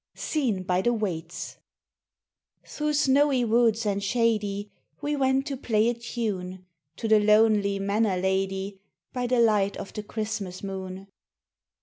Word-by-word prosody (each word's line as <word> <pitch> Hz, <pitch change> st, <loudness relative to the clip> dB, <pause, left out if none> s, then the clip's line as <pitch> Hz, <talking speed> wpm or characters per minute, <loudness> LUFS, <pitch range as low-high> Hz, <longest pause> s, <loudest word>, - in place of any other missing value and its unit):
SEEN 240 Hz, -, -1 dB
BY 180 Hz, 0 st, +1 dB
THE 240 Hz, +4 st, +2 dB
WAITS 175 Hz, -6 st, -4 dB, 1.1 s
THROUGH 300 Hz, 0 st, -2 dB
snowy 280 Hz, -3 st, +3 dB
woods 230 Hz, 0 st, +2 dB
and 200 Hz, -1 st, -1 dB
shady 210 Hz, -2 st, 0 dB, 0.3 s
We 295 Hz, 0 st, -1 dB
went 265 Hz, -1 st, +1 dB
to 285 Hz, -2 st, -3 dB
play 225 Hz, -3 st, +2 dB
a -, -, +1 dB
tune 205 Hz, -6 st, -4 dB, 0.3 s
To 225 Hz, -, -4 dB
the 220 Hz, -1 st, +6 dB
lonely 210 Hz, -1 st, +4 dB
manor 200 Hz, 0 st, +1 dB
lady 190 Hz, +1 st, -1 dB, 0.3 s
By 250 Hz, -1 st, -1 dB
the 245 Hz, 0 st, +2 dB
light 210 Hz, -4 st, +3 dB
of -, -, -8 dB
the 210 Hz, -, -4 dB
Christmas 210 Hz, -3 st, -5 dB
moon. 190 Hz, -1 st, -6 dB
210 Hz, 135 wpm, -26 LUFS, 195-240 Hz, 1.1 s, the